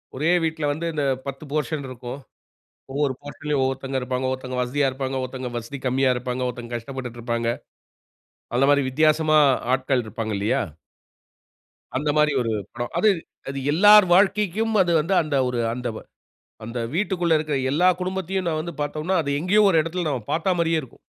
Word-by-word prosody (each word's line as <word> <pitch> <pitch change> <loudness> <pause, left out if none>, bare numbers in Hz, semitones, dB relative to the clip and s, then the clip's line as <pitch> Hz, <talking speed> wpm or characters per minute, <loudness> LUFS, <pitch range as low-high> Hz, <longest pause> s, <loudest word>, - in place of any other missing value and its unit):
ஒரே 155 +6 +1
வீட்டில 160 -1 -1
வந்து 160 +3 -4
இந்த 150 -2 -1 0.2
10 135 +2 -6
போர்ஷன் 150 -1 -2
இருக்கும். 125 +1 -7 0.7
ஒவ்வொரு 140 -1 0
போர்ஷன்லயும் 145 0 -3
ஒவ்வொருத்தவங்க 135 0 -2
இருப்பாங்க. 125 +1 -2
ஒவ்வருத்தவங்க 130 -1 -4
வசதியா 140 +3 +1
இருப்பாங்க, 130 0 -3
ஒருத்தவங்க 130 -1 -5
வசதி 120 +4 -6
கம்மியா 130 +1 +2
இருப்பாங்க. 125 +1 -3
ஒருத்தர் 120 -1 -7
கஷ்டப்பட்டுருப்பாங்க. 120 -2 -3 1.1
அந்த 135 +3 +3
மாரி 140 -1 +3
வித்தியாசமா 155 +2 +3 0.4
ஆட்கள் 130 -1 0
இருப்பாங்கல்லயா. 110 -2 -1 1.4
அந்த 150 +2 -1
மாரி 150 0 +4
ஒரு 115 - -1 0.2
படம். 120 0 -5
அது 215 - +5 0.4
அது 135 0 -4
எல்லார் 205 +5 +7
வாழ்க்கைக்கும் 205 +3 +2
அது 175 -2 +2
வந்து 170 +6 0
அந்த 155 -3 -2
ஒரு 125 -1 -2
அந்த 125 +1 -4 0.8
அந்த 115 +2 -5 0.2
வீட்டிற்குள்ள 175 -4 +1
இருக்கிற 155 -1 -2 0.2
எல்லா 175 +6 +3
குடும்பத்தையும் 185 0 -2
நம்ப 155 -2 0
வந்து 170 +1 -6
பாத்தோம்ன்னா, 155 +5 -1
அது 140 - -4
எங்கேயோ 190 +6 +3
ஒரு 165 - +3
இடத்தில 170 +2 -3
நம்ப 130 -4 -2
பார்த்த 170 +4 +1
மாரியே 165 -1 +2
இருக்கும். 130 - -14
145 Hz, 155 wpm, -23 LUFS, 130-165 Hz, 1.4 s, எல்லார்